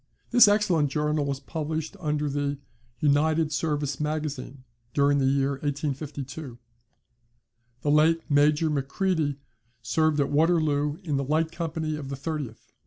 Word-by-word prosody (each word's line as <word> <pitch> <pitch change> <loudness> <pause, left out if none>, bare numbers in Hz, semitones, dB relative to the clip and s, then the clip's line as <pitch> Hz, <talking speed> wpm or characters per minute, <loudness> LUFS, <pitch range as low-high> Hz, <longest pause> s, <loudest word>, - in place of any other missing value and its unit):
[This 245 -2 +8
excellent 190 -8 +3
journal 150 +1 0
was 140 -1 -2
published 155 +2 -4
in 150 -1 0
the 145 -1 -1 0.4
"United 155 +2 +2
Service 145 -3 -1
Magazine" 150 -3 -4 0.3
during 140 0 +3
the 135 - +2
year 135 0 +2
1852.] 140 -2 -4 1.3
The 145 - +2
late 160 +2 +4
Major 150 +2 +3
Macready 150 +1 0 0.5
served 155 +5 +1
at 140 - +1
Waterloo 150 -2 +2
in 150 -5 -1
the 140 - 0
light 155 +4 0
company 160 -2 -3
of 140 -3 -7
the 140 - -3
30th. 140 -5 -6
150 Hz, 130 wpm, -26 LUFS, 140-160 Hz, 1.3 s, This